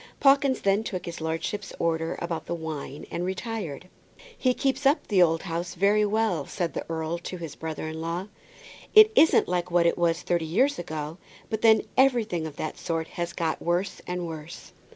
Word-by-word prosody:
Pawkins 275 -2 +4
then 200 +2 +2
took 185 -5 -4
his 170 -1 -6
lordship's 165 +5 -3
orders 165 -1 -1
about 170 -1 -4
the 170 - -2
wine 155 -3 -6
and 175 - -2
retired. 185 - -4 0.5
"He 255 -1 +1
keeps 270 +1 +1
up 290 +4 +2
the 195 -4 +3
old 165 -2 +3
house 175 0 -4
pretty 205 +3 +3
well," 205 -8 0
said 175 -3 -3
the - - -3
earl 165 +1 -2
to 180 +2 -6
his 165 -4 -7
brother 160 -1 -5
in 160 0 -5
law. 170 +4 -3 0.7
"It 430 0 +9
isn't 325 - +5
like 180 0 -1
what 175 -1 +3
it 170 - +2
was 170 0 +1
thirty 175 -2 0
years 255 - +2
ago, 155 0 -5 0.3
but 220 -1 -2
then 220 -1 +6
everything 225 -11 +2
of 150 - -9
that 155 - -5
sort 165 -1 -2
has 170 0 -4
got 160 -2 -2
worse 175 +3 -1
and 180 0 -3
worse." 160 0 -8
175 Hz, 190 wpm, -26 LUFS, 165-210 Hz, 0.7 s, It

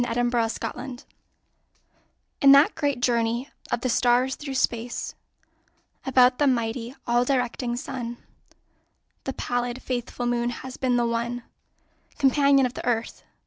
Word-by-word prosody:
A 235 - -2
SOLAR 240 0 +1
ECLIPSE 250 +3 -5 1.4
In 275 -1 +8
that 280 +2 +6
great 285 -5 -1
journey 235 +2 0 0.2
of 240 - -1
the 255 - -1
stars 245 +2 +3
through 275 -2 -6
space 240 -1 -1 0.9
About 255 -1 +5
the 290 - +4
mighty, 235 0 -1
all 240 +1 +3
directing 250 -2 -1
Sun, 245 -3 -5 1.1
The 270 - -2
pallid, 245 0 -2
faithful 245 -1 -3
Moon 240 0 0
has 255 +2 -7
been 255 -2 0
the 240 - +2
one 235 +1 -2 0.7
Companion 275 -1 +4
of 250 - -3
the - - -7
Earth. 235 -2 -1
245 Hz, 135 wpm, -25 LUFS, 240-265 Hz, 1.4 s, In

